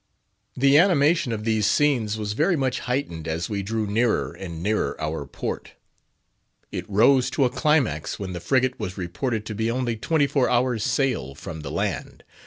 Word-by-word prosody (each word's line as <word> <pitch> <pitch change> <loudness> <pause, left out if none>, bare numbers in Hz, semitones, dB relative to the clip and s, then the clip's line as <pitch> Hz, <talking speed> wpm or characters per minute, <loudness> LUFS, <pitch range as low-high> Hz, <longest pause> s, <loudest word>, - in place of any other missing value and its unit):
The 140 +3 +5
animation 170 -5 +3
of 110 -1 -3
these 110 -2 +1
scenes 120 -8 +2
was 105 -1 -3
very 160 - +2
much 130 -3 0
heightened 85 - -2
as 85 +4 -3
we 100 -1 -1
drew 110 +2 -2
nearer 105 - +1
and 85 -3 -7
nearer 105 +2 0
our 75 -2 -3
port; - - -5 1.0
it - - -5
rose 125 +6 +4
to 140 - +2
a 125 - +1
climax 130 - +1
when 95 -2 -5
the 85 - -4
frigate 130 +5 +1
was 95 -3 -5
reported 105 +5 -3
to 110 - -5
be 110 +2 -1
only 120 -1 -1
twenty 145 +6 +1
four 140 -2 +1
hours' 120 -3 +1
sail 110 - 0
from 80 +2 -7
the 75 - -6
land. - - -3
115 Hz, 180 wpm, -24 LUFS, 95-135 Hz, 1.0 s, The